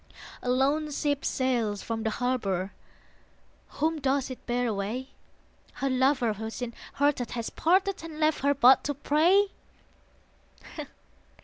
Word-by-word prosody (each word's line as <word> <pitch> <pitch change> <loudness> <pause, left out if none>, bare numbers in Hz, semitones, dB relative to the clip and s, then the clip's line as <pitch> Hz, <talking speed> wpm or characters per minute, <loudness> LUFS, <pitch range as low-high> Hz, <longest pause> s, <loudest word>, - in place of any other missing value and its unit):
A 250 - -3
lone 280 +4 +2
ship 285 -1 -1
sails 235 -6 0
from 225 -1 -3
the 220 - 0
harbour: 210 -6 -1 1.1
Whom 315 +2 +1
does 270 0 0
it 255 - -9
bear 245 +1 0
away? 225 +4 -3 0.6
Her 275 -1 -2
lover 255 -3 +2
who 220 +2 -5
sin 235 +1 -5 0.2
hearted 285 -4 +1
has 230 - -3
parted 380 +2 +1
And 320 -2 -8
left 310 0 +2
her 285 +1 +2
but 260 0 +6
to 290 - -1
pray? 345 +8 +3
260 Hz, 130 wpm, -28 LUFS, 235-295 Hz, 1.1 s, but